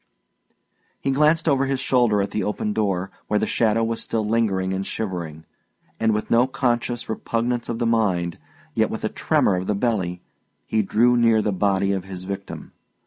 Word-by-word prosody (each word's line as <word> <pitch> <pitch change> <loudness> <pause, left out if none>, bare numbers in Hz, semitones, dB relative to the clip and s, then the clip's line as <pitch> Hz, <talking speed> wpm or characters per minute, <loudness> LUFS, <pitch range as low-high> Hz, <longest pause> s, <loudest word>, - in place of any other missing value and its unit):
He 135 - -1
glanced 150 +4 +3
over 135 -2 +3
his 135 -1 -1
shoulder 120 -7 +2
at 100 - -5
the 105 - -1
open 105 0 -2
door, 95 -3 -1 0.2
where 105 - +1
the - - +1
shadow 115 0 +1
was 115 0 -1
still 110 -2 -2
lingering 100 -4 +1
and 95 0 -2
shivering; 85 -7 -5 0.5
and 110 0 +2
with 105 0 -2
no 120 +2 +5
conscious 120 -2 -1
repugnance 115 +2 -2
of 115 - -2
the 120 - -1
mind, 95 -7 +1 0.3
yet - - +2
with - - -5
a - - 0
tremor 95 - +1
of 90 - -4
the 105 - +1
belly, 95 -6 -1 0.4
he 110 - +1
drew 115 +5 +3
near 115 -2 +4
the 105 - 0
body 100 0 +1
of 95 -2 -2
his 95 -2 -7
victim. 100 +1 -7
110 Hz, 185 wpm, -23 LUFS, 95-120 Hz, 0.5 s, no